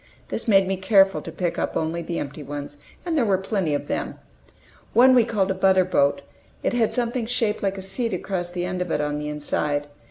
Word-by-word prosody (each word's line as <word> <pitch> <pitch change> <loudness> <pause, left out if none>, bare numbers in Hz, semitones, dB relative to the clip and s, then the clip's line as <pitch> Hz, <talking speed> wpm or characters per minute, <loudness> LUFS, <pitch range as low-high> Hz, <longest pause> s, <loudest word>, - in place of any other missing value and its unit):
This - - -3
made 195 -3 +5
me 190 0 -1
careful 195 0 +4
to 165 - -8
pick 170 +1 -2
up - - -1
only 160 +2 -2
the 170 0 -4
empty 145 +1 -5
ones, 145 0 -7 0.3
and 340 -2 -1
there 285 - +3
were 200 -4 +2
plenty 190 -5 -1
of - - -3
them. - - -3 0.8
One 255 +3 +7
we 245 -2 +6
called 205 -4 0
a - - +2
"butterboat"; 185 - +2 0.4
it - - 0
had 230 -3 +2
something 240 -1 -1
shaped 230 -3 0
like 195 -1 -1
a 190 - -6
seat 225 +5 -2
across 180 -1 -3
the 175 0 -3
end 180 0 -3
of 180 - -2
it 150 - 0
on 150 0 -1
the 150 - -4
inside. 150 0 -1
190 Hz, 220 wpm, -24 LUFS, 160-215 Hz, 0.8 s, One